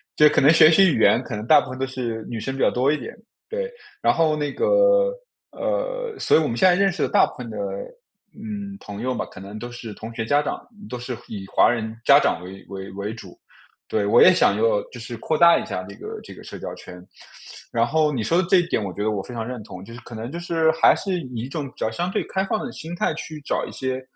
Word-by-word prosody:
就 150 0 +7
可 - - +3
能 140 +3 +7
学 155 -1 +7
习 190 +4 +6
语 - - 0
言 110 +2 +5
可 120 - -5
能 105 +1 -5
大 - - +7
部 - - -9
分 130 0 -7
都 135 - 0
是 120 -4 -4
女 115 - -4
生 135 +4 -4
比 135 - -4
较 - - +5
多 130 +3 +1
一 155 - +1
点。 125 - -8 0.3
对， 480 +1 -3 0.3
然 - - +4
后 160 -2 +2
那 145 -1 -2
个， - - +3 0.4
呃， - - -3
所 - - +4
以 - - +4
我 155 - 0
们 115 - -2
现 185 +10 +5
在 - - +5
认 195 +2 +3
识 185 - -2
的 - - 0
大 - - +5
部 - - -11
分 - - -7
的， - - -7 0.8
嗯， 205 -2 -7
朋 100 0 -8
友 130 +1 -1
嘛， - - -3
可 - - -12
能 100 +2 -8
都 120 +2 -6
是 120 -3 -8
同 110 +2 -9
学 115 - -2
家 145 +5 +3
长， 150 - -4 0.2
都 125 - -4
是 125 +1 -5
以 100 -3 -7
华 - - +4
人 110 -2 -2
家 140 - +8
长 90 - +1
为 95 +2 -10
为 95 0 -7
为 100 +3 -5
主。 115 - -12 0.5
对， 105 -2 0
我 110 +4 +6
也 185 - +9
想 100 - +3
要 110 -1 +2
就 120 - -10
是 115 +1 -7
扩 155 +7 -1
大 170 0 +7
一 - - -5
下 90 - -4
这 100 +2 -10
个 - - -7
这 - - -11
个 - - -13
社 - - -8
交 - - -6
圈。 90 0 -12 0.7
然 115 0 +3
后 155 +3 +2
你 120 -5 -1
说 165 - +1
的 180 - -4
这 190 - +6
一 175 - -1
点 115 - 0
我 100 - -4
觉 105 - -6
得 110 - +1
我 100 -2 -2
非 125 - -10
常 115 -2 -4
认 125 -1 -6
同， 95 -3 -10
就 115 - -11
是 120 - -9
可 120 - -11
能 115 +4 -6
就 170 - -5
是 165 -2 +2
还 160 - +5
是 190 -2 -2
以 125 -6 -8
一 125 - -6
种 145 -1 -4
比 - - -15
较 110 - -2
相 175 +11 -2
对 - - -1
开 190 0 -1
放 210 - -2
的 245 - -6
心 165 -3 -7
态 170 - 0
去 155 -1 -7
找 - - -2
一 - - -9
些， 130 0 -3
130 Hz, 300 characters per minute, -23 LUFS, 110-170 Hz, 0.8 s, 也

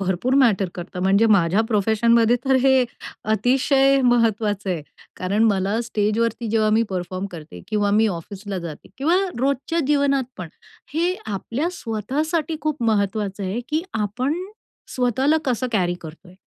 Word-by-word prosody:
भरपूर 195 +7 0
मॅटर 220 -9 +3
करतं 180 +1 -7
म्हणजे 200 +4 +4
माझ्या 195 -1 +3
प्रोफेशनमध्ये 225 +2 +3
तर 265 - +3
हे 265 -1 +4 0.5
अतिशय 270 +3 +3
महत्त्वाचं 220 -5 +1
आहे 165 -4 -2 0.3
कारण 200 +4 0
मला 200 +1 +1
स्टेजवरती 225 +1 -1
जेव्हा 215 -1 +2
मी 220 +2 +3
परफॉर्म 185 +1 -3
करते 150 - -10
किंवा 205 -1 +1
मी 220 +2 +4
ऑफिसला 195 +2 -5
जाते 165 -4 -8
किंवा 325 +6 +2 0.2
रोजच्या 280 +5 0
जीवनात 280 -2 +2
पण 175 -3 -6 0.5
हे 345 +3 +1
आपल्या 230 - -2
स्वतःसाठी 305 - -2
खूप 305 -4 -2
महत्त्वाचं 205 -2 0
आहे, 195 +6 -2
की 310 +2 0
आपण 225 +7 -1 0.6
स्वतःला 260 +4 +2
कसं 255 -2 0
कॅरी 180 -5 +1
करतोय. 170 +3 -12
220 Hz, 140 wpm, -22 LUFS, 195-265 Hz, 0.6 s, म्हणजे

